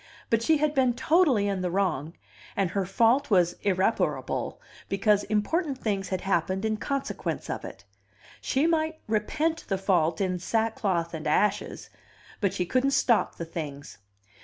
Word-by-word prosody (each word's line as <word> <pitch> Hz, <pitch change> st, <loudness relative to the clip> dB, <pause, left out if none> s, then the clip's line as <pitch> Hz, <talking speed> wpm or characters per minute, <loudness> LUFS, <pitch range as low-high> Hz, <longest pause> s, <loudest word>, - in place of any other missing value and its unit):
But 230 Hz, -1 st, +3 dB
she 315 Hz, +7 st, +3 dB
had 300 Hz, 0 st, +1 dB
been 255 Hz, -4 st, +2 dB
totally 265 Hz, -, +3 dB
in 195 Hz, -2 st, -1 dB
the 180 Hz, -, -1 dB
wrong, 170 Hz, -5 st, -1 dB, 0.4 s
and 195 Hz, -4 st, +1 dB
her 195 Hz, -2 st, -1 dB
fault 235 Hz, +8 st, +3 dB
was 175 Hz, -4 st, +4 dB
irreparable, 195 Hz, +2 st, 0 dB, 0.3 s
because 205 Hz, +1 st, +2 dB
important 270 Hz, -, 0 dB
things 200 Hz, -6 st, -2 dB
had 185 Hz, -1 st, -2 dB
happened 190 Hz, +2 st, 0 dB
in 215 Hz, 0 st, 0 dB
consequence 275 Hz, +5 st, -3 dB
of -, -, -4 dB
it; -, -, -9 dB, 0.6 s
she 275 Hz, +3 st, +1 dB
might 320 Hz, -1 st, +1 dB
repent 310 Hz, +10 st, -1 dB
the 195 Hz, -, 0 dB
fault 175 Hz, -4 st, +1 dB
in 185 Hz, -2 st, 0 dB
sackcloth 195 Hz, -5 st, -1 dB
and 155 Hz, -1 st, -4 dB
ashes, 195 Hz, +7 st, 0 dB, 0.5 s
but 200 Hz, -4 st, +1 dB
she 180 Hz, -, -2 dB
couldn't 260 Hz, +6 st, +2 dB
stop 235 Hz, -3 st, +2 dB
the 170 Hz, -, -5 dB
things. 150 Hz, -6 st, -7 dB
205 Hz, 155 wpm, -27 LUFS, 185-260 Hz, 0.6 s, was